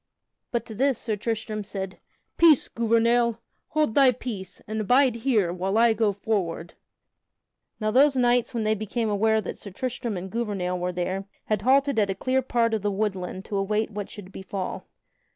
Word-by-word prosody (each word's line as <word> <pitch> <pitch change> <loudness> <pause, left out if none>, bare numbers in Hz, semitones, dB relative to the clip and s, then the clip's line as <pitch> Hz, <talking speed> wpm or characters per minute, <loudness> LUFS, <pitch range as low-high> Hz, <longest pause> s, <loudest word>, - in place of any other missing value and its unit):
But 235 -2 -2
to 220 - -8
this 265 +3 +1
Sir 220 -2 -2
Tristram 220 0 -3
said: 195 -2 -6 0.4
"Peace, 325 -5 +5
Gouvernail! 230 0 +2 0.3
Hold 305 -7 0
thy 270 -1 +6
peace, 210 -7 -7
and 215 -1 -3
bide 255 -2 +4
here 225 -8 +1
while 190 +3 -1
I 230 0 +5
go 220 -1 +2
forward!" 190 -5 -2 1.1
Now 215 -1 0
those 275 +4 +5
knights 245 -1 +3
when 235 -3 -2
they 215 0 +2
became 215 +1 -2
aware 220 +2 +2
that 190 - -6
Sir 200 - -8
Tristram 235 +1 -4
and 185 +1 -6
Gouvernail 195 -6 -2
were 180 +1 -1
there, 185 +2 -3 0.2
had 215 -2 0
halted 270 +1 +3
at 205 -2 +2
a 195 - -1
clear 260 +6 +1
part 230 -2 +1
of 220 - 0
the 205 - 0
woodland 190 -2 -3
to 200 - -3
await 210 +3 0
what 205 -1 -5
should 195 -2 -10
befall. 190 -1 -5
215 Hz, 180 wpm, -25 LUFS, 195-235 Hz, 1.1 s, thy